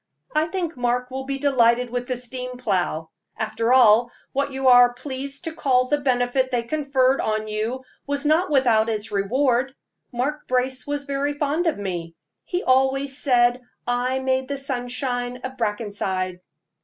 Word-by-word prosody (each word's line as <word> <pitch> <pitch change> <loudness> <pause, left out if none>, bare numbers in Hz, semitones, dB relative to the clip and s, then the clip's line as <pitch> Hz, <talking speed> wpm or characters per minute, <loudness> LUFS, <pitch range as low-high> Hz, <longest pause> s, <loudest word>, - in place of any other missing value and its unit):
I 305 +1 +2
think 340 -2 -3
Mark 245 0 -1
will 265 0 -4
be 275 0 -3
delighted 250 -3 +2
with 245 0 -3
the 255 -2 -1
steam 250 +1 -5
plow. 175 -8 -1 0.3
After 225 +2 -1
all, 240 -1 +6 0.2
what 280 +1 0
you 265 0 -1
are 245 -1 +7
pleased 275 +3 -5
to 325 -2 -4
call 255 -5 +2
the 295 - +2
benefit 255 -1 +1
they 245 -2 0
conferred 270 -1 +1
on 215 0 -1
you 220 +4 -3 0.3
was 285 +1 -2
not 320 +5 +3
without 235 -6 +3
its 215 -1 -3
reward. 250 +6 +1 0.4
Mark 275 +5 -3
Brace 255 +2 0
was 290 0 -2
very 280 +1 -1
fond 295 +4 0
of 325 - +1
me 175 -4 -5 0.3
he 360 0 -3
always 265 +1 +2
said 245 -3 +3 0.3
I 245 +2 0
made 260 0 0
the 280 0 -3
sunshine 250 -2 -2
of 260 0 -5
Brackenside." 200 -5 -2
255 Hz, 160 wpm, -23 LUFS, 240-275 Hz, 0.4 s, are